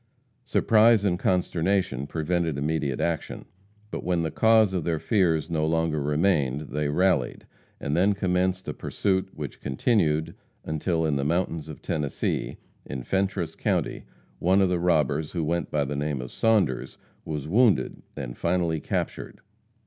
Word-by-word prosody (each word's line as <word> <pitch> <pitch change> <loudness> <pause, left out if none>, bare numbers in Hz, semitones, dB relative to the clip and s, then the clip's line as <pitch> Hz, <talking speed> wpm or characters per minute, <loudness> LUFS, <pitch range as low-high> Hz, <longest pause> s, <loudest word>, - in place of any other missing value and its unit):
Surprise 115 -3 +4
and 90 -2 +1
consternation 90 -6 0
prevented 80 -1 -1
immediate 70 -2 -1
action. 85 -2 -2 0.5
But - - -4
when 90 -2 0
the 80 - -2
cause 110 -1 +4
of 90 -4 -1
their 85 -1 0
fears 85 -5 +1
no 80 -2 -1
longer 80 -2 0
remained, 75 -2 +1
they 75 +1 -1
rallied, 85 -5 +1 0.3
and 70 - -2
then 95 +4 +3
commenced 95 -1 0
a - - -2
pursuit 95 -1 -1
which 75 -3 -7
continued 80 - +1 0.3
until 80 +1 -1
in 75 -3 +1
the 70 - -1
mountains 80 0 -1
of 75 - -10
Tennessee, 75 -5 -2 0.3
in 65 -1 -6
Fentress 95 -1 -1
county, - - -1 0.3
one 95 +3 +3
of 95 -2 +3
the 90 -1 +1
robbers, 80 -3 +1
who 85 -3 -1
went 85 +3 -1
by 75 -2 0
the 70 +2 -4
name 75 -1 -2
of 60 -1 -6
Saunders, 105 - +1 0.3
was 75 -2 -4
wounded 110 +5 +2 0.2
and 60 -3 -5
finally 85 -1 0
captured. - - -4
80 Hz, 150 wpm, -26 LUFS, 75-95 Hz, 0.5 s, Surprise